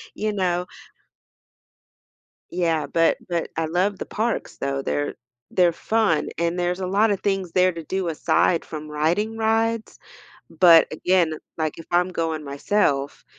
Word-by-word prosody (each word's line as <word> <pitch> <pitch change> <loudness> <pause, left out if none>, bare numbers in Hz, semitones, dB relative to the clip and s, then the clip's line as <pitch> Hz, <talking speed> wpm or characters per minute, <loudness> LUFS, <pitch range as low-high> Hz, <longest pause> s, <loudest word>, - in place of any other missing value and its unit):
You 215 0 -2
know? 180 -3 0 1.9
Yeah, 165 -4 0
but 165 0 +2
but 170 -2 -2
I 165 - 0
love 185 +5 0
the - - -5
parks, 225 +2 -2
though. 140 0 -2
They're 75 - -2 0.4
they're 180 -2 +3
fun, 215 -2 +1
and 170 +1 0
there's 180 +1 -1
a 185 - -2
lotta 205 +2 +2
things 195 -3 -2
there 185 0 +3
to 165 -1 -8
do 190 +1 -2
aside 165 +1 +1
from 155 -1 -7
riding 175 +9 0
rides, 225 0 0 0.5
but, 170 -3 +6
again, 170 0 +2 0.2
like, 155 -2 -1
if 165 - -10
I'm 175 +1 +3
going 160 -3 -3
myself, 140 -1 -1
175 Hz, 145 wpm, -23 LUFS, 160-195 Hz, 1.9 s, but